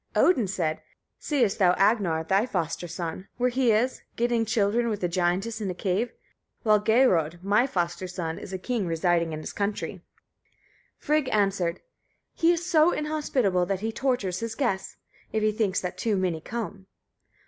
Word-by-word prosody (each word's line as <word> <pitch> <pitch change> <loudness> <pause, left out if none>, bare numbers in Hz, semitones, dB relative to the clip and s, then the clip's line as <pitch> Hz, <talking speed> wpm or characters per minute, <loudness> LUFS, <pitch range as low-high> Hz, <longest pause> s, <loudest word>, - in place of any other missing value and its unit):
Odin 255 - +4
said, 170 -4 -2 0.4
"Seest 250 -9 +1
thou 180 -2 +5
Agnar, 195 -5 +2
thy 195 +8 +2
foster 175 -5 -2
son, 170 +2 -5
where 250 +1 +1
he 250 -1 +3
is, 235 +4 +1
getting 235 -1 +1
children 225 +2 +1
with 210 -4 -3
a - - +3
giantess 185 +6 -1
in 200 - -2
a 180 - -3
cave? 200 +6 -1 0.5
while 215 -2 +4
Geirröd, 200 - +3
my 210 +6 +3
foster 175 -3 -2
son, 170 -3 -4
is - - -9
a 190 - -3
king 215 0 -2
residing 170 0 +1
in 155 0 -5
his - - -7
country." 205 0 -3 1.0
Frigg 300 -3 +1
answered, 195 -5 0 0.5
"He 330 +1 +3
is 345 0 -1
so 335 -1 +4
inhospitable 265 - 0
that 195 0 -2
he 225 +1 -1
tortures 220 -8 -1
his 230 -1 -4
guests, 210 -9 -2 0.3
if 220 -1 0
he 215 - +3
thinks 210 -3 0
that 180 0 -5
too 215 -3 +1
many 180 -4 -1
come." 205 -2 -6
200 Hz, 170 wpm, -26 LUFS, 180-235 Hz, 1.0 s, thou